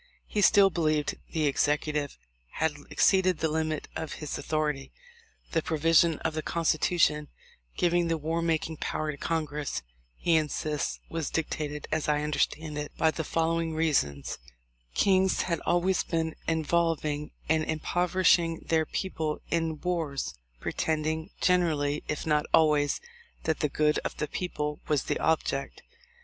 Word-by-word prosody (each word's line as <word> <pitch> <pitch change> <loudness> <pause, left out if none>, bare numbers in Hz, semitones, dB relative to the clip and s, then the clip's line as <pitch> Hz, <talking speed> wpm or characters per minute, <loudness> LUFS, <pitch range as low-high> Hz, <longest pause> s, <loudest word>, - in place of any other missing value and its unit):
He 210 - -1
still 195 -1 +6
be 170 - -2
lieved 155 -2 +1 0.2
the 160 -2 0
Executive 145 0 0 0.4
had 160 0 +1 0.2
exceeded 185 -3 +3
the 160 - +1
limit 155 -1 -1
of 160 -2 -4
his 150 -2 -5
authority. 150 -3 -1 0.6
"The 165 - +2
provision 165 +1 +3
of 160 - -1
the 155 - -2
Constitution 155 -2 +2 0.5
giving 175 -1 +2
the 165 0 +1
war 160 +2 -1
making 160 -1 0
power 155 +1 -2
to 145 - -9
Congress," 150 - -2 0.3
he 165 - +2
insists, 150 -1 -1
"was 165 -3 -3
dictated, 150 -2 -3
as 155 -1 0
I 150 0 +2
understand 150 0 -1
it, 150 - -5
by 160 - +3
the 160 - -3
following 165 +1 0
reasons: 130 - 0 0.6
kings 190 -1 +3
had 170 -2 -1
always 180 +2 +2
been 160 -1 -1
involving 160 -2 0 0.2
and 160 0 +2
impoverishing 170 +1 +2
their 160 -1 +2
people 160 -5 -3
in 165 -2 0
wars, 165 -6 -2 0.3
pretending 160 - -1
generally, 155 -5 +2
if 150 - -3
not 150 -1 +2
always, 150 -2 +3 0.4
that 160 -1 0
the 150 - +1
good 150 +2 +2
of - - -5
the 150 - -1
peo 180 +3 -3
ple 150 0 -3
was 150 -3 +1
the - - -1
object. 140 -4 0
160 Hz, 145 wpm, -28 LUFS, 150-165 Hz, 0.6 s, still